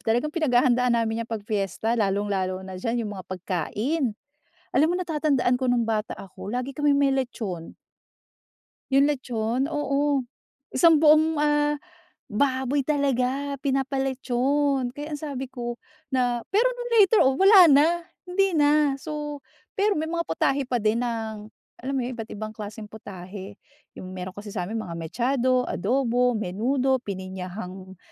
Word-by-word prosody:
talagang 245 +7 0
pinaghahandaan 250 -5 +3
namin 225 0 0
'yan 230 - -11
'pag 220 -3 -4
fiesta, 215 +1 -1
lalung-lalo 195 -2 -1
na 185 -1 -8
diyan 230 +1 -1
yung 205 - -4
mga 185 - -8
pagkain. 210 - -2 0.6
Alam 310 - +5
mo, 355 - 0
natatandaan 300 -7 +1
ko 255 0 -1
nung 235 -2 +2
bata 215 -1 -1
ako, 195 +1 -9
lagi 250 +3 -3
kaming 290 -1 +3
may 275 -1 +3
lechon. 215 -10 -4 1.2
Yung 275 +2 +5
lechon, 255 -1 -1
oo, 285 -2 +1 0.5
isang 320 +3 +6
buong, 310 0 +5
ah, 295 0 +2 0.6
baboy 265 +4 +1
talaga 280 -1 0
pinapa-lechon! 270 0 0
Kaya 295 +2 -6
ang 290 - -6
sabi 280 -4 -4
ko 240 -2 -5 0.3
na 250 -3 +1
pero 445 +6 +3
nung 485 -1 -6
later 415 +2 +6
on, 265 0 +4
wala 390 +2 +7
na, 285 +2 +6 0.4
hindi 380 +1 +1
na. 295 -1 +4
So, 295 0 -6 0.3
pero 405 -4 +2
may 315 - -1
mga 335 +1 -1
putahe 275 -3 0
pa 250 -1 0
din 220 +2 +1
ng 220 -3 -4 0.2
alam 265 +3 -5
mo - - +1
yun, 255 - -4
iba't 225 -1 -7
ibang 215 +1 -6
klaseng 210 0 -7
putahe. 195 -1 -9 0.4
Yung, 185 0 -8
meron 185 0 -5
kasi 205 +2 -9
sa'min, 200 +3 -3
mga 180 -6 -5
mechado, 250 - 0
adobo, 250 -1 +1
menudo, 245 +6 0
pininyahang 185 -1 -7
250 Hz, 145 wpm, -25 LUFS, 215-285 Hz, 1.2 s, wala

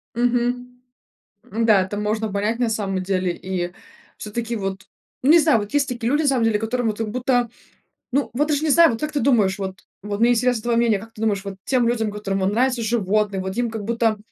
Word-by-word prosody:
Мгм. 245 +1 -1 0.7
Ну 225 +3 0
да, 210 -4 +5
это 190 +2 -4
можно 215 0 -1
понять 210 +4 -1
на 240 - +1
самом 195 -4 -2
деле. 185 -2 0
И 180 -1 -4 0.5
всё-таки 230 +2 -4
вот, 195 -2 -4 0.4
ну 285 - +5
не 340 - +8
знаю, 305 -8 +4
вот 205 +5 -6
есть 290 -1 +2
такие 240 -1 -2
люди 295 - +2
на - - +1
самом 260 -4 +2
деле, 215 -2 +2
которым 230 +1 -1
вот 215 - -1
как 225 -1 -3
будто, 245 -1 +1 0.6
ну 280 +2 0
вот 295 +5 +1
даже 300 -1 0
не 315 - +1
знаю. 330 0 +6
Вот 225 - -4
как 305 0 -2
ты 290 - -1
думаешь? 215 -7 +2
Вот 190 0 -5 0.2
вот 205 0 -4
мне 235 +1 +4
интересно 245 -1 +1
твое 235 -1 +1
мнение: 230 -4 +2
как 225 +2 -13
ты 220 - -11
думаешь, 205 -3 0
вот 195 -1 -5
тем 250 -3 +2
людям, 225 -3 0
которым 200 -2 -3
вон 190 0 +1
нравятся 245 +2 +1
животные, 210 -3 0
вот 190 +2 -5
им 240 -1 0
как 220 -2 -5
будто, 225 0 +1
225 Hz, 230 wpm, -22 LUFS, 205-245 Hz, 0.7 s, не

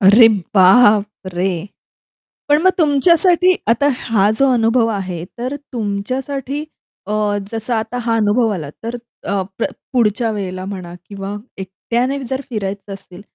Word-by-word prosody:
अरे 220 +4 +8 0.3
बाप 205 +1 +5
रे! 180 -1 -1 0.8
पण 295 +1 +4
मग 375 - +6
तुमच्यासाठी 340 +4 +4
आता 235 +5 +3
हा 210 -3 +2
जो 275 - +4
अनुभव 230 0 +3
आहे, 185 -5 -4
तर 255 +4 -3 0.2
तुमच्यासाठी 255 +6 -3 0.4
अ, 210 - -3 0.4
जसं 225 +2 -2
आता 225 +2 -2
हा 230 -1 +1
अनुभव 225 +2 +2
आला 155 -6 -5
तर 230 - -3 0.3
अ, 200 -1 -1 0.2
प 230 - 0 0.3
पुढच्या 230 -1 +1
वेळेला 185 -3 -4
म्हणा 185 -3 -7
किंवा 200 0 -6 0.2
एकट्याने 235 +8 -2
जर 260 +2 -3
फिरायचं 200 -2 -4
असेल, 185 -1 -13
225 Hz, 135 wpm, -18 LUFS, 195-250 Hz, 0.8 s, अरे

